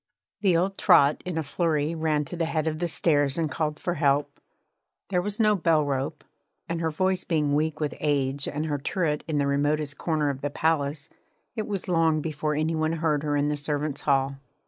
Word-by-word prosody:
The 185 Hz, -5 st, +3 dB
old 190 Hz, +3 st, -1 dB
trot 140 Hz, +1 st, +5 dB
in 175 Hz, -3 st, -3 dB
a 160 Hz, -, 0 dB
flurry 155 Hz, 0 st, 0 dB
ran 155 Hz, -2 st, 0 dB
to 175 Hz, -, -7 dB
the 165 Hz, -1 st, 0 dB
head 155 Hz, -1 st, -1 dB
of 155 Hz, -1 st, -2 dB
the 175 Hz, -, 0 dB
stairs 145 Hz, -4 st, +1 dB
and 160 Hz, -3 st, -1 dB
called 150 Hz, 0 st, -2 dB
for 175 Hz, -, -1 dB
help. 145 Hz, -2 st, +1 dB, 0.7 s
There 180 Hz, -2 st, +1 dB
was 205 Hz, +3 st, -4 dB
no 215 Hz, -1 st, +4 dB
bell 165 Hz, -5 st, +2 dB
rope, 135 Hz, -1 st, -2 dB, 0.4 s
and, 170 Hz, 0 st, -2 dB
her 165 Hz, -, +1 dB
voice 185 Hz, +4 st, 0 dB
being 150 Hz, -4 st, 0 dB
weak 155 Hz, +1 st, 0 dB
with 150 Hz, -2 st, -1 dB
age 140 Hz, -2 st, 0 dB
and 150 Hz, +2 st, -2 dB
her 145 Hz, -2 st, -2 dB
turret 150 Hz, 0 st, -1 dB
in 155 Hz, -2 st, -1 dB
the 140 Hz, -, +2 dB
remotest 145 Hz, +1 st, 0 dB
corner 155 Hz, -3 st, 0 dB
of 135 Hz, -1 st, -8 dB
the 145 Hz, -, -1 dB
palace, 145 Hz, -1 st, 0 dB, 0.5 s
it 215 Hz, -, -3 dB
was 200 Hz, -3 st, -4 dB
long 165 Hz, -3 st, +3 dB
before 150 Hz, -1 st, -2 dB
any 155 Hz, +2 st, 0 dB
one 155 Hz, 0 st, 0 dB
heard 155 Hz, -3 st, 0 dB
her 145 Hz, -1 st, 0 dB
in 145 Hz, 0 st, +1 dB
the 150 Hz, -, -1 dB
servants' 145 Hz, 0 st, -2 dB
hall. 135 Hz, -1 st, +1 dB
155 Hz, 210 wpm, -26 LUFS, 145-165 Hz, 0.7 s, trot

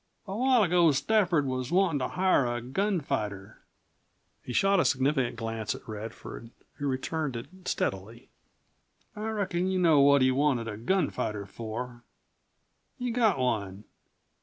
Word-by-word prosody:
A 195 Hz, -1 st, -5 dB
while 250 Hz, 0 st, +4 dB
ago 175 Hz, -3 st, +4 dB
Stafford 170 Hz, +1 st, +2 dB
was 130 Hz, -1 st, -3 dB
wantin' 175 Hz, -5 st, +2 dB
to 125 Hz, -, -1 dB
hire 185 Hz, -8 st, +2 dB
a 120 Hz, 0 st, -2 dB
gunfighter." 125 Hz, -, -2 dB, 0.8 s
He -, -, -8 dB
shot 195 Hz, +9 st, +3 dB
a -, -, +4 dB
significant 130 Hz, -2 st, +1 dB
glance 115 Hz, -2 st, -3 dB
at -, -, -13 dB
Radford, 110 Hz, +1 st, -8 dB, 0.3 s
who 145 Hz, -, -2 dB
returned 135 Hz, +1 st, -2 dB
it 115 Hz, -, -5 dB, 0.2 s
steadily. 100 Hz, +5 st, -3 dB, 0.9 s
"I 215 Hz, +1 st, -4 dB
reckon 190 Hz, -4 st, -1 dB
you 190 Hz, -, 0 dB
know 165 Hz, -5 st, +5 dB
what 140 Hz, -1 st, +6 dB
he 130 Hz, -, +4 dB
wanted 130 Hz, -4 st, +1 dB
a 105 Hz, -, -4 dB
gunfighter 115 Hz, -, -1 dB
for. 120 Hz, +4 st, -6 dB, 1.0 s
He 250 Hz, -2 st, -2 dB
got 225 Hz, -, +2 dB
one. 105 Hz, -6 st, -2 dB
135 Hz, 140 wpm, -28 LUFS, 115-185 Hz, 1.0 s, what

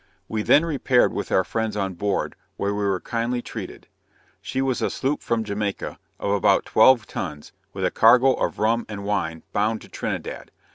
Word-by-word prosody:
We 110 Hz, -1 st, -2 dB
then 145 Hz, +9 st, +5 dB
repaired 135 Hz, -5 st, +2 dB
with -, -, -4 dB
our 95 Hz, -, +4 dB
friends 110 Hz, +2 st, -2 dB
on 95 Hz, -2 st, -1 dB
board, 100 Hz, +3 st, -2 dB, 0.2 s
where 100 Hz, 0 st, -1 dB
we 105 Hz, 0 st, -2 dB
were 95 Hz, -2 st, +1 dB
kindly 120 Hz, +3 st, -2 dB
treated. -, -, -8 dB, 0.5 s
She 130 Hz, -, -4 dB
was 135 Hz, -2 st, 0 dB
a -, -, +1 dB
sloop 135 Hz, +3 st, -2 dB
from 115 Hz, -1 st, 0 dB
Jamaica, 100 Hz, -1 st, -3 dB, 0.2 s
of 100 Hz, -, -1 dB
about 100 Hz, -1 st, +3 dB
twelve 120 Hz, 0 st, +5 dB
tons, 75 Hz, -8 st, -6 dB, 0.2 s
with -, -, -3 dB
a -, -, +1 dB
cargo 125 Hz, +4 st, +6 dB
of -, -, -2 dB
rum 115 Hz, +2 st, +1 dB
and 100 Hz, -2 st, -6 dB
wine, 95 Hz, -6 st, -2 dB
bound 110 Hz, +2 st, 0 dB
to -, -, -14 dB
Trinidad. -, -, -5 dB
110 Hz, 185 wpm, -24 LUFS, 100-120 Hz, 0.5 s, cargo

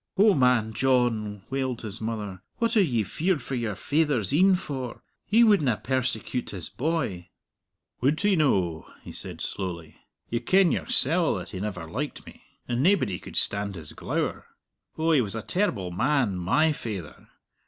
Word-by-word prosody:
"O 205 Hz, +1 st, +6 dB
man 125 Hz, -6 st, +3 dB
John," 115 Hz, -5 st, +1 dB
wailed 130 Hz, -3 st, -2 dB
his 110 Hz, 0 st, -4 dB
mother, 105 Hz, -4 st, -4 dB, 0.2 s
"what 230 Hz, 0 st, 0 dB
are 215 Hz, -, +6 dB
ye 120 Hz, -, +1 dB
feared 165 Hz, -, 0 dB
for -, -, -6 dB
your 115 Hz, -5 st, -2 dB
faither's 145 Hz, -, 0 dB
een 185 Hz, +5 st, +5 dB
for? 135 Hz, -9 st, -5 dB, 0.2 s
He 225 Hz, +3 st, +5 dB
wouldna 155 Hz, -, +4 dB
persecute 130 Hz, -1 st, -2 dB
his 90 Hz, -5 st, -7 dB
boy." 120 Hz, -, -2 dB, 0.7 s
"Would 140 Hz, +5 st, +2 dB
he 205 Hz, -1 st, +3 dB
no?" 95 Hz, -, +1 dB
he -, -, -9 dB
said -, -, -8 dB
slowly. 85 Hz, -5 st, -4 dB, 0.3 s
"You 120 Hz, -, -1 dB
ken 185 Hz, +7 st, +4 dB
yoursell 165 Hz, +5 st, +2 dB
that -, -, -6 dB
he 95 Hz, -, -6 dB
never 95 Hz, -4 st, -4 dB
liked 140 Hz, -, -5 dB
me! -, -, -13 dB, 0.3 s
And 120 Hz, 0 st, 0 dB
naebody 160 Hz, -, +2 dB
could -, -, -11 dB
stand 100 Hz, -1 st, 0 dB
his 80 Hz, -4 st, -7 dB
glower. -, -, -3 dB, 0.5 s
Oh, 160 Hz, +1 st, +2 dB
he 150 Hz, -5 st, +5 dB
was 105 Hz, -2 st, -4 dB
a 110 Hz, -, -4 dB
terrible 110 Hz, -, -1 dB
man, 120 Hz, +1 st, +1 dB
my 95 Hz, -, +2 dB
faither! 105 Hz, -, -6 dB
125 Hz, 165 wpm, -26 LUFS, 100-155 Hz, 0.7 s, O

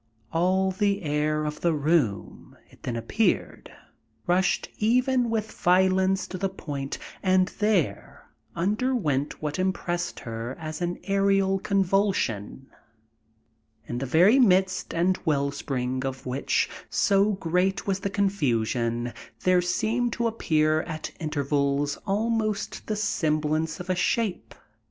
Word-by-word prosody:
All 185 Hz, +3 st, +2 dB
the 200 Hz, +1 st, 0 dB
air 150 Hz, 0 st, 0 dB
of 150 Hz, 0 st, -4 dB
the 170 Hz, -2 st, +2 dB
room, 145 Hz, -8 st, -1 dB
it -, -, -20 dB
then 120 Hz, -, -3 dB
appeared, 190 Hz, -, -1 dB, 0.5 s
rushed 180 Hz, +1 st, +1 dB
even 245 Hz, +2 st, +2 dB
with 220 Hz, -1 st, -2 dB
violence 185 Hz, +1 st, +2 dB
to 185 Hz, -, -5 dB
the 195 Hz, -, 0 dB
point 140 Hz, -7 st, -5 dB, 0.2 s
and 185 Hz, -1 st, +3 dB
there 190 Hz, -, 0 dB, 0.3 s
underwent 185 Hz, -, 0 dB
what 150 Hz, +4 st, -2 dB
impressed 175 Hz, -2 st, -2 dB
her 115 Hz, +2 st, -5 dB
as 155 Hz, +1 st, -6 dB
an 175 Hz, 0 st, -1 dB
aerial 195 Hz, -1 st, +2 dB
convulsion, 190 Hz, -, 0 dB, 1.2 s
in 120 Hz, +1 st, -4 dB
the 135 Hz, -, -3 dB
very 180 Hz, -, +5 dB
midst 190 Hz, -5 st, +3 dB
and 180 Hz, +3 st, +1 dB
well 140 Hz, -4 st, +1 dB
spring 130 Hz, -2 st, -3 dB
of 135 Hz, -1 st, -5 dB
which, 130 Hz, +2 st, 0 dB, 0.2 s
so 205 Hz, -1 st, +3 dB
great 185 Hz, +1 st, 0 dB
was 195 Hz, -1 st, 0 dB
the 200 Hz, -, -2 dB
confusion, 120 Hz, -, 0 dB, 0.3 s
there 185 Hz, -1 st, +4 dB
seemed 225 Hz, +7 st, 0 dB
to 235 Hz, -, -1 dB
appear 155 Hz, -8 st, +2 dB
at 155 Hz, 0 st, -6 dB
intervals 145 Hz, -2 st, 0 dB
almost 215 Hz, 0 st, -1 dB
the 215 Hz, -, -1 dB
semblance 155 Hz, -5 st, 0 dB
of 180 Hz, -, -7 dB
a 185 Hz, -, +1 dB
shape. 205 Hz, +2 st, -1 dB
180 Hz, 125 wpm, -26 LUFS, 150-195 Hz, 1.2 s, very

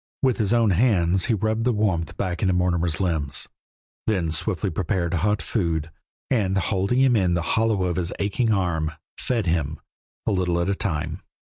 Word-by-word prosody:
With 130 Hz, -3 st, +3 dB
his 105 Hz, -2 st, +1 dB
own 115 Hz, -3 st, +4 dB
hands 95 Hz, -3 st, +3 dB
he 115 Hz, -, +2 dB
rubbed 110 Hz, +2 st, 0 dB
the 125 Hz, -, +3 dB
warmth 100 Hz, -7 st, 0 dB
back 90 Hz, -3 st, -2 dB
into 95 Hz, -3 st, +2 dB
Mortimer's 85 Hz, -2 st, +1 dB
limbs, 80 Hz, -7 st, -1 dB, 0.6 s
then 90 Hz, -7 st, +1 dB
swiftly 80 Hz, +4 st, -1 dB
prepared 85 Hz, +1 st, -1 dB
hot 105 Hz, +4 st, +1 dB
food, 85 Hz, -6 st, -1 dB, 0.4 s
and, 100 Hz, -6 st, +2 dB
holding 100 Hz, +5 st, +1 dB
him 130 Hz, -2 st, +4 dB
in 90 Hz, -5 st, +2 dB
the 85 Hz, -, 0 dB
hollow 110 Hz, -4 st, +2 dB
of 90 Hz, -1 st, -1 dB
his 90 Hz, -1 st, -1 dB
aching 105 Hz, +3 st, 0 dB
arm, 85 Hz, -6 st, 0 dB, 0.3 s
fed 115 Hz, -5 st, -1 dB
him, 80 Hz, -3 st, -1 dB, 0.5 s
a -, -, +1 dB
little 90 Hz, -2 st, +1 dB
at 85 Hz, +3 st, +1 dB
a -, -, +2 dB
time. 80 Hz, -4 st, -3 dB
95 Hz, 175 wpm, -24 LUFS, 85-105 Hz, 0.6 s, own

